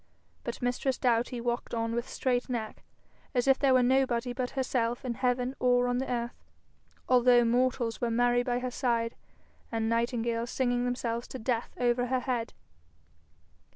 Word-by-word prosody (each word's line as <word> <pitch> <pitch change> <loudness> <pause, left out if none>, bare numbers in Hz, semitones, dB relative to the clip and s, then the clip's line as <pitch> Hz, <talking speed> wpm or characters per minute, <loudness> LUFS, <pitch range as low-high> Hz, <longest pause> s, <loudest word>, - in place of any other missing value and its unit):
But - - -5
mistress 250 +1 0
Doughty 245 0 +1
walked 240 0 -2
on 230 0 -1
with 235 +1 -3
straight 250 -1 -1
neck, 225 -3 -4 0.5
as 245 +1 +1
if 270 0 +5
there 270 -2 +4
were 255 - +5
nobody 250 -1 +2
but 250 -1 -2
herself 245 -2 -1
in 245 - -1
heaven 250 +1 0
or 245 0 +3
on 245 0 0
the 265 - -3
earth, 235 -1 -3 0.6
although 245 -1 +5
mortals 240 -1 +1
were 240 - +1
merry 245 +1 +3
by 245 0 -1
her 250 0 -3
side, 235 -2 0 0.6
and 225 -1 -1
nightingales 235 0 0
singing 245 -1 0
themselves 240 -1 -2
to - - -7
death 235 0 -2
over 245 0 +2
her 255 0 0
head. 240 -3 -2
245 Hz, 160 wpm, -29 LUFS, 235-250 Hz, 0.6 s, if